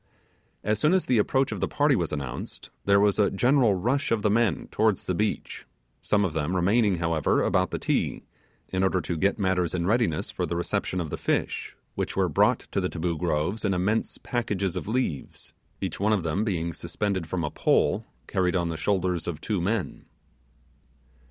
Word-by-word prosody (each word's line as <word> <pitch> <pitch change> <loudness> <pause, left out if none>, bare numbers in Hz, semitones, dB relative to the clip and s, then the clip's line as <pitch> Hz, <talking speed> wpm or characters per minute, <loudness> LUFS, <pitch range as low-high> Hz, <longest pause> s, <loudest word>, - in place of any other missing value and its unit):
As 105 0 0
soon 150 +9 +3
as 190 - +1
the 125 -3 +3
approach 130 +6 +2
of - - -3
the - - 0
party 145 -1 +2
was 85 -7 -1
announced, 70 -5 -6
there 100 0 +5
was 105 +1 +3
a 105 - +4
general 120 0 +3
rush 125 +10 0
of 110 -3 +1
the 105 - +3
men 115 -1 +1
towards 110 -3 +2
the 90 - 0
beach; 105 +4 -2 0.3
some 105 -1 +2
of 85 - -2
them 80 +3 -1
remaining, 100 +3 +3
however, 85 -2 +1
about - - +2
the - - -3
Ti - - -1 0.5
in 95 - -1
order 95 -1 +2
to 85 0 -3
get 95 +5 +1
matters 95 -4 0
in 85 -1 -1
readiness 110 -6 +1
for - - -2
the 85 - -3
reception 85 +1 -1
of 80 -4 -4
the - - -3
fish, - - -2 0.2
which - - -3
were - - +3
brought - - +3
to 95 - 0
the 90 - -1
Taboo 85 0 -2
Groves 85 +5 -1
in 100 -3 +1
immense 105 +5 0
packages 100 -7 -2
of 90 - -4
leaves, 110 - -3 0.3
each - - -3
one 105 +2 +2
of 100 -5 0
them 85 +5 0
being 85 -6 -1
suspended 95 0 -2
from 85 0 -2
a 75 - -2
pole - - +2 0.2
carried 90 -1 0
on 85 -2 +1
the 80 - -3
shoulders 90 -1 0
of 80 -3 -3
two 100 +2 -2
men. 95 -4 -2
95 Hz, 195 wpm, -26 LUFS, 85-105 Hz, 0.5 s, there